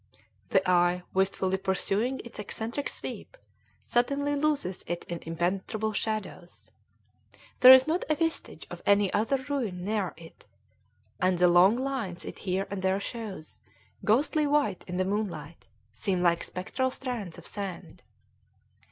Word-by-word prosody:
The 190 -1 +2
eye, 180 0 +3
wistfully 190 0 +1
pursuing 200 +7 0
its 235 - -10
eccentric 225 +6 -3
sweep, - - -7 0.5
suddenly 280 +4 +1
loses 285 -11 0
it 175 0 -3
in 170 -1 -5
impenetrable 190 +6 -1
shadows. 210 -4 -4 0.9
There 255 - +11
is 260 0 +9
not 325 +4 0
a 310 - +3
vestige 325 0 -2
of - - -7
any 200 -1 +3
other 260 +6 +1
ruin 220 -11 -2
near 205 -5 -1
it, 165 0 -15 0.7
and 185 0 +2
the 180 +1 +5
long 175 +5 +6
lines 255 -10 -3
it - - -8
here 190 0 -1
and 200 -1 -3
there 190 +1 +1
shows, 205 -7 -6 0.4
ghostly 290 +7 +2
white 290 -9 +1
in 180 -1 -4
the 185 - +1
moonlight, 190 -6 -4 0.3
seem 185 -3 -1
like 170 -1 +3
spectral 255 +8 -2
strands 245 -9 -5
of - - -12
sand. 195 -4 -6
200 Hz, 140 wpm, -28 LUFS, 180-255 Hz, 0.9 s, There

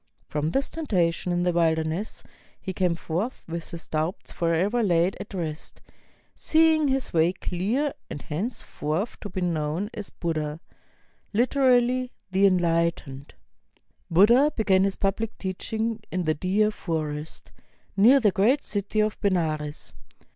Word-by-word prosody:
From 150 +1 -2
this 270 +11 0
temptation 180 - 0
in 175 0 +1
the 180 - +2
wilderness 165 +3 0 0.4
he 190 - -5
came 180 -2 +1
forth 180 +10 -3
with 165 0 -5
his 170 0 -8
doubts 160 +5 -3
forever 175 +8 +1
laid 180 -2 +2
at - - -8
rest, 160 -4 -5 0.5
seeing 315 -1 +3
his 270 -1 -1
way 165 +2 +3
clear, 215 +12 -1 0.2
and - - -5
henceforth 170 - -3
to 205 - -7
be 185 -1 -4
known 170 +3 -1
as 210 -2 -6
Buddha, 155 -3 -3 0.8
HteraUy 255 0 +3 0.2
"The 190 +1 +4
EnHghtened." 170 -6 0 0.8
Buddha 235 - +5
began 195 -4 +3
his 195 - -1
public 205 +3 -2
teaching 220 +4 -3
in 180 0 -1
the 155 -1 +1
Deer 195 +7 +1
Forest, 155 -5 -4 0.4
near 235 +8 +6
the 215 -5 +3
great 235 +10 +2
city 205 +1 -1
of 215 0 -1
Benares. 155 -6 -1
185 Hz, 135 wpm, -25 LUFS, 165-220 Hz, 0.8 s, near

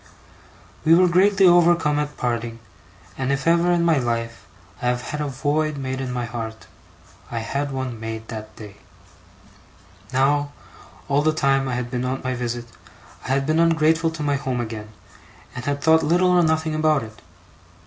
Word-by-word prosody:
We 160 +1 +6
were 180 +1 +5
greatly 195 +3 +4
overcome 175 -4 +4
at 150 0 -4
parting; 115 -1 -2 0.6
and 130 0 0
if 140 0 -1
ever, 170 +1 +3
in 170 -1 +2
my 165 -4 +3
life, 115 -2 -3 0.3
I 125 - -1
have 125 0 0
had 150 +4 -4
a 150 - -1
void 145 +3 -1
made 130 -1 -4
in 130 -1 -4
my 125 -1 -2
heart, 110 -1 -6 0.6
I 120 - -5
had 140 +5 -2
one 130 -3 -4
made 110 0 -6
that 110 -1 -8
day. 105 -2 -11 1.3
Now, 145 +2 +1 0.5
all 140 0 +2
the 155 +1 +2
time 135 -3 +1
I 125 - -2
had 120 -1 -4
been 125 -1 -2
on 130 +1 -2
my 130 0 -1
visit, 120 -1 -4 0.6
I - - -7
had 135 +1 +1
been 155 +2 +1
ungrateful 165 0 +3
to 160 -2 -6
my 145 -1 +1
home 130 -2 -3
again, 110 -2 -5 0.7
and 125 - -6
had 145 0 -2
thought 160 0 +5
little 175 +4 +3
or 180 -1 +5
nothing 160 -1 +1
about 155 -3 +2
it. 110 -1 -12
140 Hz, 180 wpm, -22 LUFS, 120-155 Hz, 1.3 s, We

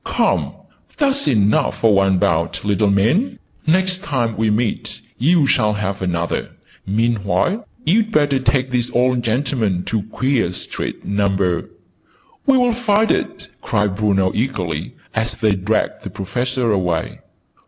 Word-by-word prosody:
Come, - - 0 0.4
that's 280 -1 +1
enough 105 -4 +2
for 110 -2 +5
one 95 -1 +3
bout, 85 +2 0
little 105 0 +2
man!' 115 - +2 0.3
Next 185 +2 +2
time 130 - -1
we 110 0 +1
meet, 110 +1 -1 0.2
you 160 +4 +4
shall 105 -5 +2
have 100 -2 -3
another. 85 -2 -2 0.4
Meanwhile 110 - 0 0.2
you'd 220 +5 +2
better 145 -7 +2
take 130 0 0
this 125 -1 0
old 125 0 +2
gentleman 115 -6 0
to 110 +1 -1
Queer 130 -7 0
Street, - - -5
Number 95 -3 0 0.4
" - - -35
"We'll 250 -3 +4
find 220 -2 +2
it!" - - -2
cried 100 -2 0
Bruno 95 -3 +1
eagerly, 90 - -3 0.2
as 115 +1 -1
they 110 -1 +1
dragged 100 +3 -1
the - - -7
Professor 120 +4 -2
away. 90 -5 -1
110 Hz, 135 wpm, -19 LUFS, 100-135 Hz, 0.4 s, for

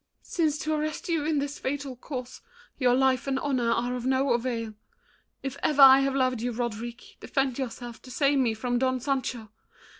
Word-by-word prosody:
"Since 310 -4 0
to 310 - 0
arrest 305 +2 -3
you 325 -3 +1
in 310 -1 +1
this 285 +1 -3
fatal 275 -1 -3
course 255 -1 -7 0.4
Your 250 -2 +4
life 265 0 +2
and 270 -1 0
honor 260 -4 0
are 240 +2 0
of 245 - -5
no 265 +1 +2
avail, 235 -2 -2 0.7
If 270 0 -4
ever 290 -2 +5
I 265 0 +10
have 275 0 0
loved 255 -3 +1
you, 245 +1 -1
Roderick, 235 0 -5
Defend 270 -2 -1
yourself 240 -2 -6
to 255 - -13
save 275 +2 +2
me 235 -4 +1
from 245 +2 -1
Don 260 0 +1
Sancho. 250 -5 -3
260 Hz, 185 wpm, -27 LUFS, 245-275 Hz, 0.7 s, I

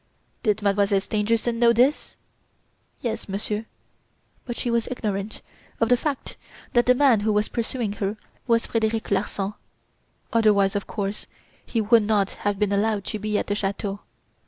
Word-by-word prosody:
"Did 215 -2 +1
Mademoiselle 200 0 +3
Stangerson 225 +3 0
know 235 -1 +6
this?" 255 +6 +2 0.9
"Yes, 230 -4 -3
Monsieur; 210 +2 -3 0.8
but 240 - -4
she 240 - -2
was 235 -1 +1
ignorant 210 -4 -3 0.4
of 230 - +2
the 250 - +6
fact 280 +2 -4 0.4
that 240 0 +3
the 250 - +6
man 255 -5 +5
who 215 +1 +1
was 210 +1 +1
pursuing 235 -2 -2
her 200 +2 -1 0.3
was 230 -1 +3
Frederic 220 -1 -1
Larsan, 200 0 -1 0.8
otherwise, 205 -4 +4
of 200 - -2
course, 200 -1 -4 0.4
he 230 - -2
would 225 +2 +5
not 205 -2 +1
have 205 -1 -2
been 205 0 +1
allowed 205 0 +1
to 215 - -3
be 210 0 -1
at - - -1
the 205 - -1
chateau. 200 0 -2
215 Hz, 155 wpm, -24 LUFS, 200-230 Hz, 0.9 s, know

